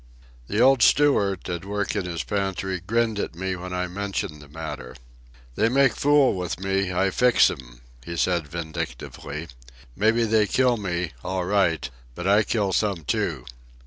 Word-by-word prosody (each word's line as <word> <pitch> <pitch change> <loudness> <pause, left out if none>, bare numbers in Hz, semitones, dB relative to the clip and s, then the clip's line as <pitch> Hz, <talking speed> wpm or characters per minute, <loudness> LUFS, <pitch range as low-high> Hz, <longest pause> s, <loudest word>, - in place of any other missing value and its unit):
The 105 - -1
old 130 +1 +5
steward, 105 - +3
at 85 -1 -4
work 105 +1 -2
in 100 -3 -1
his 85 -2 -3
pantry, 95 -2 -2
grinned 110 +3 0
at 80 - -3
me 95 +1 -2
when 90 +1 -7
I 90 0 -1
mentioned 90 -5 -4
the 70 - -13
matter. 70 -5 -7 0.6
"They 110 - +2
make 135 +1 +3
fool 145 -2 +4
with 90 -2 -4
me, 95 -1 0
I 95 +2 +1
fix 125 +5 +4
'em," - - -11 0.2
he 85 +4 -6
said 85 -3 +1
vindictively. 75 -1 -6 0.5
"Mebbe 115 +3 +2
they 110 -1 +3
kill 125 0 +2
me, 90 -5 -2
all 90 0 -2
right; 90 -8 +1 0.3
but 85 - -6
I 100 +2 +5
kill 105 -3 0
some, 100 -4 0
too." - - -1
95 Hz, 165 wpm, -24 LUFS, 85-105 Hz, 0.6 s, old